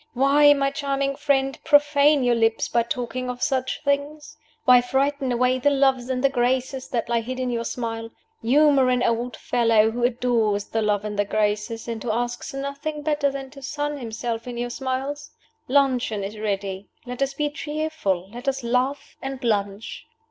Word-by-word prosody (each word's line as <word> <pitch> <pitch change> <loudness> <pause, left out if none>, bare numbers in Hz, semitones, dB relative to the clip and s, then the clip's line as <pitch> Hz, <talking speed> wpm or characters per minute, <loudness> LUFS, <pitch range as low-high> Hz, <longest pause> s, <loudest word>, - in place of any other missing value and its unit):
Why, 285 +3 +5
my 275 -1 +1
charming 275 -2 -1
friend, 270 -2 0
profane 290 -1 +4
your 245 -1 +3
lips 225 -1 +1
by 235 - +2
talking 250 +1 -3
of 250 0 -4
such 260 0 -1
things? 290 +2 -2 0.3
Why 250 -2 +7
frighten 270 +1 0
away 250 +1 +2
the 285 - +3
Loves 270 -3 +2
and 255 0 -1
the 275 - +5
Graces 260 +1 -1
that 235 -2 -2
lie 235 -1 +1
hid 255 +3 -5
in 255 -1 -1
your 235 -1 -2
smile. 225 -2 -4 0.3
Humor 275 +2 +4
an 250 -1 +2
old 235 +1 -1
fellow 225 -2 +3
who 240 +1 -3
adores 235 -4 +1
the 225 - -1
Loves 210 -1 0
and 210 -1 -4
the 205 - +3
Graces, 215 +2 -1
and 230 -2 -4
who 240 - -4
asks 240 +2 -2
nothing 280 +2 -4
better 295 -2 +1
than 270 -1 -7
to 275 0 -12
sun 290 +1 -3
himself 230 0 -4
in 245 -1 -5
your 240 0 -3
smiles. 270 +3 -3 0.4
Luncheon 255 -6 +2
is 210 +2 -6
ready. 200 -2 -3 0.2
Let 250 +1 -7
us 275 0 0
be 295 0 -1
cheerful. 295 - -2
Let 245 +3 -9
us 270 -1 -1
laugh 255 +4 -1
and 270 -1 -6
lunch." 205 -2 -2
255 Hz, 180 wpm, -24 LUFS, 230-275 Hz, 0.4 s, Why